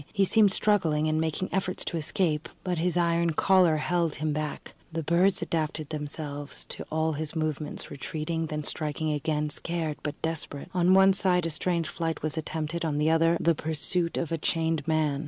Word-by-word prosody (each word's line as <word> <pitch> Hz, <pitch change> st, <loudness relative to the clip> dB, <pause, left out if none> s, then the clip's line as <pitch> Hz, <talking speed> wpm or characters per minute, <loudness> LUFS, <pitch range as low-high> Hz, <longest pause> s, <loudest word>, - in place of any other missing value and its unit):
He 200 Hz, -2 st, +2 dB
seemed 205 Hz, +1 st, +4 dB
struggling 165 Hz, -8 st, +2 dB
and 155 Hz, 0 st, +1 dB
making 160 Hz, +3 st, -2 dB
efforts 185 Hz, -1 st, -1 dB
to -, -, -3 dB
escape, 155 Hz, -1 st, 0 dB
but 180 Hz, -3 st, -1 dB
his 175 Hz, +1 st, 0 dB
iron 170 Hz, -1 st, +2 dB
collar 180 Hz, -2 st, +4 dB
held 170 Hz, 0 st, 0 dB
him 155 Hz, 0 st, -1 dB
back. 150 Hz, 0 st, -4 dB, 0.2 s
The 165 Hz, 0 st, -3 dB
birds 175 Hz, +5 st, +3 dB
adapted 155 Hz, -2 st, -2 dB
themselves 145 Hz, -1 st, -5 dB
to -, -, -6 dB
all 160 Hz, 0 st, +1 dB
his 155 Hz, +2 st, -4 dB
movements, 155 Hz, -2 st, -3 dB
retreating, 160 Hz, +3 st, -3 dB
then 150 Hz, 0 st, -3 dB
striking 155 Hz, +1 st, -2 dB
again, 150 Hz, 0 st, -1 dB
scared 165 Hz, -1 st, -3 dB
but 150 Hz, -, -5 dB
desperate. 160 Hz, -3 st, -3 dB
On 180 Hz, +1 st, +4 dB
one 195 Hz, 0 st, +7 dB
side 180 Hz, -3 st, +2 dB
a 165 Hz, -, -1 dB
strange 170 Hz, +1 st, 0 dB
flight 165 Hz, -3 st, -3 dB
was 155 Hz, -1 st, 0 dB
attempted, 160 Hz, +1 st, -3 dB
on 155 Hz, -3 st, -1 dB
the 155 Hz, +2 st, +3 dB
other 165 Hz, +1 st, +4 dB
the 170 Hz, -, +3 dB
pursuit 160 Hz, +3 st, 0 dB
of 170 Hz, -, -2 dB
a 165 Hz, -, -1 dB
chained 160 Hz, -1 st, 0 dB
man. 155 Hz, -3 st, +1 dB
160 Hz, 185 wpm, -28 LUFS, 150-170 Hz, 0.2 s, one